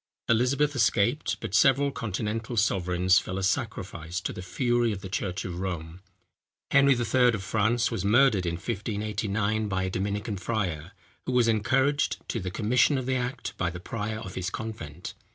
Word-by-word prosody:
Elizabeth 140 +5 +2
escaped; 115 -5 +2
but - - -5
several 135 +4 +4
continental 115 0 -3
sovereigns 90 -3 +3
fell 95 - -5
a 95 - -2
sacrifice 95 - -2
to - - -4
the - - -7
fury 120 +5 +1
of 100 -2 -5
the 95 - -7
church 95 -1 -3
of 90 -2 -5
Rome. 90 -2 -5 0.7
Henry 140 -1 +6
III., 120 +1 +3
of 95 - -5
France, 110 +4 +1
was 95 - -2
murdered 105 -3 +4
in 85 - -1
1589, 105 +1 -2
by 95 -2 -1
a 95 - -2
Dominican 100 +2 -2
friar, 95 -4 -3 0.3
who 130 - -1
was 125 -2 +4
encouraged 130 +7 +2
to 115 - -1
the 95 -2 -4
commission 120 +8 +2
of 130 - -3
the 130 0 0
act 125 +2 -3
by 90 - +1
the 85 0 -7
prior 110 +3 -4
of 95 -4 -7
his 95 0 -3
convent. 90 -7 -6
105 Hz, 170 wpm, -27 LUFS, 95-120 Hz, 0.7 s, Henry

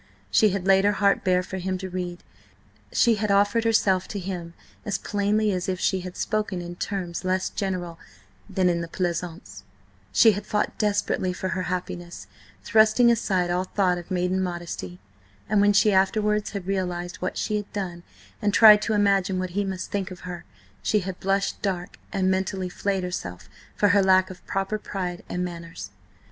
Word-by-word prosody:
She 215 - +5
had 190 -1 -3
laid 195 0 +5
her 205 +1 +3
heart 200 0 +2
bare 185 -1 +2
for 190 +1 -6
him 185 +1 -2
to 190 0 -5
read; 180 -1 -5 0.7
she 230 -2 +3
had 210 - 0
offered 205 +3 +3
herself 195 -5 +2
to 205 - -5
him 175 -3 -5 0.3
as 210 -4 -1
plainly 210 +1 0
as 185 -1 -2
if 185 -1 -2
she 190 - +1
had 180 0 -8
spoken 210 -4 -1
in 175 0 -7
terms 180 -4 -4
less 185 0 0
general 180 -4 -3 0.5
than 185 -1 +1
in 170 -1 +1
the 170 - -4
pleasaunce; 175 0 -4 0.5
she 225 - +6
had 205 0 -5
fought 210 - 0
desperately 205 -3 0
for 185 +1 -4
her 185 +1 -2
happiness, 175 -1 -5 0.4
thrusting 220 +2 +5
aside 185 -6 +1
all 180 +1 0
thought 185 -2 +1
of 175 - -12
maiden 185 +1 0
modesty, 175 - -5 0.5
and 210 +1 +3
when 205 0 +5
she 205 +1 +4
afterwards 210 +2 +2
had 200 -3 -4
realised 180 -2 -2
what 185 - -4
she 215 -2 0
had 205 -1 -6
done, 180 -4 -4 0.4
and 205 -1 +1
tried 210 -2 +9
to 220 - -1
imagine 195 -2 +2
what 185 -1 -3
he 205 +3 0
must 190 -2 -4
think 200 -1 -2
of 185 -2 -10
her, 175 0 -7 0.4
she 210 -1 +1
had 185 0 -6
blushed 195 +1 0
dark, 180 -3 -3
and 190 -2 +1
mentally 190 0 -1
flayed 195 +1 -2
herself 90 - -5 0.3
for 205 - +3
her 200 +1 +5
lack 190 0 +4
of 185 - -12
proper 195 +2 -1
pride 180 -4 -4
and 180 0 -2
manners. 170 - -8
190 Hz, 185 wpm, -25 LUFS, 180-205 Hz, 0.7 s, tried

